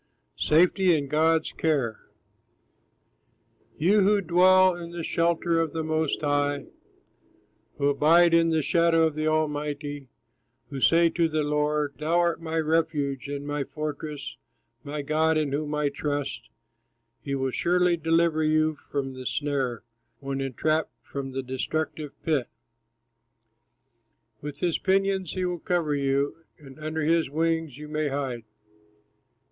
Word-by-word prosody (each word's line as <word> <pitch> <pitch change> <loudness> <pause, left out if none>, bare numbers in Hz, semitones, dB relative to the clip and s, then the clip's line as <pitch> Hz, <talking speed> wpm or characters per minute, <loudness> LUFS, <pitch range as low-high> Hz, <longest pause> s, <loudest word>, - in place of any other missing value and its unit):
SAFETY 175 +2 +3
IN 140 -2 -3
GOD'S 160 +2 +2
CARE 135 -9 -1 1.8
You 195 +7 +3
who 205 +2 +4
dwell 185 +1 +5
in 170 -1 -8
the 170 -1 -6
shelter 170 0 +1
of 160 -3 -2
the 160 -1 -2
Most 155 -1 -1
High, 145 -1 0 1.1
Who 140 - +1
abide 165 +4 +4
in 165 0 +4
the 160 -2 +1
shadow 165 0 +3
of 160 - 0
the 155 +1 -2
Almighty, 145 -2 -2 0.6
Who 135 -2 -5
say 170 +3 +5
to 170 -2 +1
the 155 -1 0
Lord, 150 -2 -1
"Thou 160 +3 +1
art 170 -1 +1
my 165 0 -3
refuge, 155 -4 0
And 145 0 -5
my 145 -1 -2
fortress, 150 0 -6 0.5
my 145 0 -5
God 155 +2 +2
in 150 -3 0
whom 150 +1 -2
I 150 -1 +1
trust," 145 0 -4 0.7
He 140 -1 -3
will 135 -1 -1
surely 180 +4 +2
deliver 165 0 +1
you 155 0 +2
from 140 -2 -5
the 130 -1 -6
snare, 135 -6 -2 0.4
When 135 0 -4
entrapped 155 +4 -1
from 135 -1 -5
the 135 0 -3
destructive 150 +3 -3
pit. 150 -6 0 1.9
With 145 -1 -7
his 175 -3 0
pinions 195 -2 +1
he 185 -1 -2
will 180 -1 -2
cover 165 -3 0
you, 140 +1 0 0.2
And 140 -1 -14
under 155 +1 -3
his 165 -1 +2
wings 160 -2 -1
you 150 0 -9
may 155 0 -1
hide. 135 -5 -3
155 Hz, 140 wpm, -26 LUFS, 145-165 Hz, 1.9 s, dwell